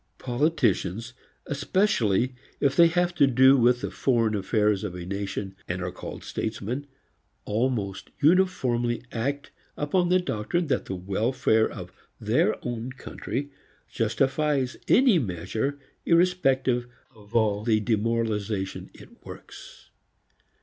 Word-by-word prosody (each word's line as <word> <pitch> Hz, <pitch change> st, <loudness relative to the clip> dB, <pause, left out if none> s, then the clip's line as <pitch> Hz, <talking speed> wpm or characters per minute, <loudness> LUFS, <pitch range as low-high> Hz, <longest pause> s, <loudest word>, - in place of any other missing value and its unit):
Politicians, 120 Hz, -, 0 dB, 0.3 s
especially 135 Hz, -, +1 dB, 0.3 s
if 140 Hz, -2 st, +2 dB
they 170 Hz, -1 st, +7 dB
have 175 Hz, +1 st, +1 dB
to 150 Hz, -5 st, +4 dB
do 130 Hz, +1 st, +6 dB
with 120 Hz, -1 st, +3 dB
the -, -, -4 dB
foreign 115 Hz, -4 st, +1 dB
affairs 105 Hz, 0 st, +1 dB
of 95 Hz, -4 st, -4 dB
a 90 Hz, -1 st, -6 dB
nation 100 Hz, 0 st, -4 dB
and 90 Hz, +1 st, -3 dB
are 90 Hz, -, -3 dB
called -, -, -8 dB
statesmen, 115 Hz, +6 st, -4 dB, 0.6 s
almost 105 Hz, -3 st, -2 dB
uniformly 130 Hz, -9 st, +2 dB
act 140 Hz, +5 st, -3 dB, 0.3 s
upon 175 Hz, +4 st, +1 dB
the 180 Hz, -, +5 dB
doctrine 175 Hz, +1 st, -1 dB
that 135 Hz, -5 st, -1 dB
the 95 Hz, -, -4 dB
welfare 110 Hz, +5 st, +1 dB
of -, -, -9 dB, 0.3 s
their -, -, +2 dB
own 120 Hz, +1 st, -4 dB
country 130 Hz, +1 st, -5 dB, 0.4 s
justifies 135 Hz, +3 st, 0 dB
any 245 Hz, -8 st, +5 dB
measure 110 Hz, -, -3 dB, 0.3 s
irrespective 135 Hz, -8 st, +2 dB, 0.3 s
of 105 Hz, 0 st, -16 dB
all 105 Hz, -2 st, +2 dB
the 110 Hz, -1 st, +2 dB
demoralization 110 Hz, -3 st, -1 dB
it -, -, -16 dB
works. -, -, -12 dB
120 Hz, 120 wpm, -26 LUFS, 105-145 Hz, 0.6 s, they